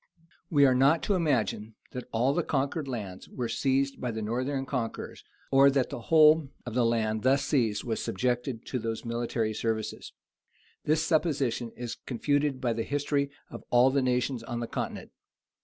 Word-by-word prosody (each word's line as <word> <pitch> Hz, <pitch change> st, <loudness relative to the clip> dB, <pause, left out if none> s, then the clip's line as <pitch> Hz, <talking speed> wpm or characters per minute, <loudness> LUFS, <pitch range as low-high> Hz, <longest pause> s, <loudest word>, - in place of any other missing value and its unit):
We 145 Hz, -3 st, +5 dB
are 130 Hz, -, +5 dB
not 135 Hz, +6 st, +4 dB
to 205 Hz, -, +1 dB
imagine, 115 Hz, -, 0 dB, 0.2 s
that 125 Hz, -, -6 dB
all 125 Hz, +5 st, +2 dB
the 175 Hz, -, +1 dB
conquered 140 Hz, 0 st, -1 dB
lands 105 Hz, -8 st, -6 dB
were 125 Hz, -2 st, -3 dB
seized 135 Hz, +3 st, 0 dB
by 125 Hz, -, -1 dB
the 110 Hz, -1 st, -4 dB
northern 130 Hz, +5 st, -2 dB
conquerors, 125 Hz, -4 st, -4 dB, 0.3 s
or 135 Hz, +1 st, +7 dB
that 135 Hz, -2 st, 0 dB
the 140 Hz, -, -4 dB
whole 155 Hz, -2 st, +6 dB, 0.2 s
of 120 Hz, -, -5 dB
the 120 Hz, -1 st, +3 dB
land 110 Hz, -2 st, 0 dB
thus 135 Hz, +3 st, +3 dB
seized 115 Hz, -7 st, +1 dB
was 115 Hz, -2 st, -2 dB
subjected 125 Hz, +2 st, -2 dB
to 125 Hz, -, -3 dB
those 115 Hz, +1 st, -4 dB
military 115 Hz, -1 st, -1 dB
services. 110 Hz, 0 st, -3 dB, 0.7 s
This 155 Hz, +1 st, +2 dB
supposition 140 Hz, -8 st, 0 dB
is 120 Hz, -1 st, -5 dB
confuted 145 Hz, +2 st, 0 dB
by 120 Hz, -3 st, 0 dB
the 115 Hz, -, -2 dB
history 145 Hz, +2 st, -1 dB, 0.2 s
of -, -, -8 dB
all 125 Hz, +2 st, +5 dB
the 140 Hz, 0 st, +2 dB
nations 125 Hz, -1 st, 0 dB
on 120 Hz, +1 st, -5 dB
the 120 Hz, -, -2 dB
continent. -, -, -5 dB
125 Hz, 175 wpm, -28 LUFS, 115-140 Hz, 0.7 s, or